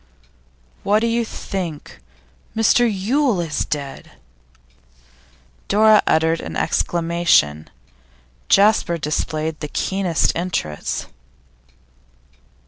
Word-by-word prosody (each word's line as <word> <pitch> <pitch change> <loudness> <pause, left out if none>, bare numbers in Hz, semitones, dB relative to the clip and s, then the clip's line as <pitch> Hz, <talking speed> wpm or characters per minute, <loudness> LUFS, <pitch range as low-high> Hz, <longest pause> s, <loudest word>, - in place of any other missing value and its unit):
'What 210 +2 +2
do - - +1
you 230 +1 +1
think? 180 -8 -6 0.6
Mr 230 +2 +4
Yule 225 +3 0
is 165 -3 -2
dead!' 140 -2 -6 1.5
Dora 215 +1 +5
uttered 160 +1 +2
an - - -7
exclamation; 170 - +1 0.8
Jasper 200 -4 +3
displayed 155 0 -3
the 150 - -5
keenest 185 +1 0
interest. 165 - -3
175 Hz, 80 wpm, -20 LUFS, 155-210 Hz, 1.5 s, Dora